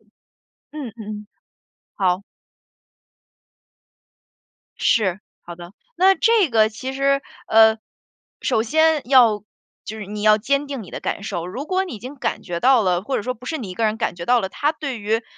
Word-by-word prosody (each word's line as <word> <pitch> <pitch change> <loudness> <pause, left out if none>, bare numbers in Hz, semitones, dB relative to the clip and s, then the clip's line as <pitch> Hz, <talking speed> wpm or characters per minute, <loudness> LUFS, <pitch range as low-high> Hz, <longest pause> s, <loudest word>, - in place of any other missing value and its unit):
嗯， - - -33 0.8
嗯 - - -17
嗯， 210 -1 -7 0.7
好。 185 0 +1 2.6
是， 195 -4 +1 0.2
好 175 - -9
的。 175 +1 -12 0.2
那 380 +2 +5
这 440 -6 +3
个 220 -2 +4
其 255 +5 -6
实， 275 +1 +1 0.3
呃， 220 0 +6 0.6
首 220 - +1
先 315 +4 +2
要 235 -6 +5 0.4
就 220 +1 -7
是 205 - -7
你 210 +1 -6
要 215 0 +6
坚 280 +6 0
定 275 -4 -5
你 190 - -12
的 - - -6
感 - - -3
受， 175 -5 -4
如 250 +10 -6
果 375 +2 0
你 360 - -7
已 215 - -8
经 255 +6 -9
感 255 - -3
觉 170 -1 -4
到 250 +5 +4
了， 180 -2 +1
或 260 +6 -2
者 - - -2
说 255 +4 -3
不 250 +2 -15
是 315 - -2
你 215 -8 -6
一 180 - -7
个 225 - -1
人 215 0 +1
感 225 -5 -2
觉 170 0 -7
到 245 -1 +4
了， 190 - -3
他 295 +9 -1
对 280 -6 -5
于 220 +2 -1
225 Hz, 200 characters per minute, -21 LUFS, 205-275 Hz, 2.6 s, 呃